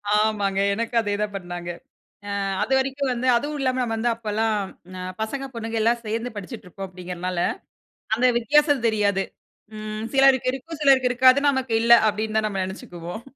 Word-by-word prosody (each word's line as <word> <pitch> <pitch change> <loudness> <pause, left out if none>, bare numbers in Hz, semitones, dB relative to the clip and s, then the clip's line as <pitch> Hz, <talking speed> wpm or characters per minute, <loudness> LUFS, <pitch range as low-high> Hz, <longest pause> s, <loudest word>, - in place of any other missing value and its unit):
ஆமாங்க. 205 -2 +1
எனக்கும் 230 +2 0
அதே 205 -1 -2
தான் 210 -1 -2
பண்ணாங்க. 175 -2 -6 0.6
ஆ - - -3 0.3
அதுவரைக்கும் 265 0 0
வந்து 245 +1 -2
அதுவும் 290 +4 -2
இல்லாம 255 -1 0
நம்ம 225 -2 -1
வந்து 235 +2 +1
அப்பல்லாம் 220 -1 -1 0.4
அ - - -6 0.2
பசங்க, 270 +5 -3
பொண்ணுங்க 225 0 -4
எல்லாம் 235 +1 +2
சேந்து 230 +3 -3
படிச்சிட்டு 205 0 -8
இருப்போம் 195 +2 -7
அப்பிடிங்கிறனால, 180 -1 -5 0.8
அந்த 245 +3 +2
வித்தியாசம் 290 +1 +3
தெரியாது. 205 -3 +2 0.5
ம், 215 +1 -5
"சிலருக்கு 270 -2 +5
இருக்கும், 310 +4 -7
சிலருக்கு 265 -3 +5
இருக்காது. 255 +2 +6
நமக்கு 265 -3 -2
இல்ல" 235 +1 +5 0.2
அப்பிடின்னு 215 +1 -1
தான் 215 0 +1
நம்ம 195 -2 -2
நெனச்சுக்குவோம். 180 +2 -8
225 Hz, 155 wpm, -23 LUFS, 205-255 Hz, 0.8 s, இருக்காது